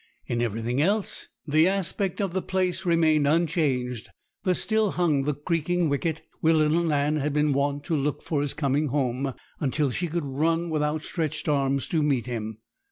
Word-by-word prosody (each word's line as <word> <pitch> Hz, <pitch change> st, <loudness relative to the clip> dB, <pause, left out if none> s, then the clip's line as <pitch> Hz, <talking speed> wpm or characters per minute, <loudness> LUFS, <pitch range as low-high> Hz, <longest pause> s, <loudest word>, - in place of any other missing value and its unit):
In 120 Hz, 0 st, -1 dB
everything 120 Hz, +3 st, -1 dB
else 200 Hz, +5 st, 0 dB, 0.2 s
the 155 Hz, +3 st, +4 dB
aspect 195 Hz, 0 st, -1 dB
of 195 Hz, -4 st, -1 dB
the 190 Hz, -, 0 dB
place 185 Hz, 0 st, -1 dB
remained 160 Hz, -3 st, +3 dB
unchanged; 145 Hz, -7 st, 0 dB, 0.3 s
there 185 Hz, -1 st, +2 dB
still 220 Hz, 0 st, +1 dB
hung 155 Hz, -6 st, +1 dB
the 150 Hz, -1 st, 0 dB
creaking 165 Hz, +2 st, 0 dB
wicket, 155 Hz, +3 st, -1 dB, 0.2 s
where 160 Hz, 0 st, +4 dB
little 155 Hz, +2 st, +3 dB
Nan 150 Hz, -1 st, +1 dB
had 150 Hz, 0 st, -1 dB
been 150 Hz, -1 st, +2 dB
wont 140 Hz, +1 st, 0 dB
to 160 Hz, -, -1 dB
look 145 Hz, 0 st, -1 dB
for 150 Hz, -3 st, -1 dB
his 145 Hz, -1 st, -2 dB
coming 145 Hz, +1 st, +1 dB
home, 135 Hz, -1 st, -1 dB, 0.2 s
until 145 Hz, -1 st, 0 dB
she 175 Hz, +7 st, -2 dB
could 165 Hz, -1 st, -2 dB
run 165 Hz, +5 st, 0 dB
with 155 Hz, -1 st, 0 dB
outstretched 155 Hz, 0 st, -2 dB
arms 140 Hz, -2 st, +1 dB
to 160 Hz, -, +1 dB
meet 140 Hz, -5 st, +1 dB
him. 110 Hz, -3 st, -4 dB
150 Hz, 175 wpm, -26 LUFS, 140-170 Hz, 0.3 s, the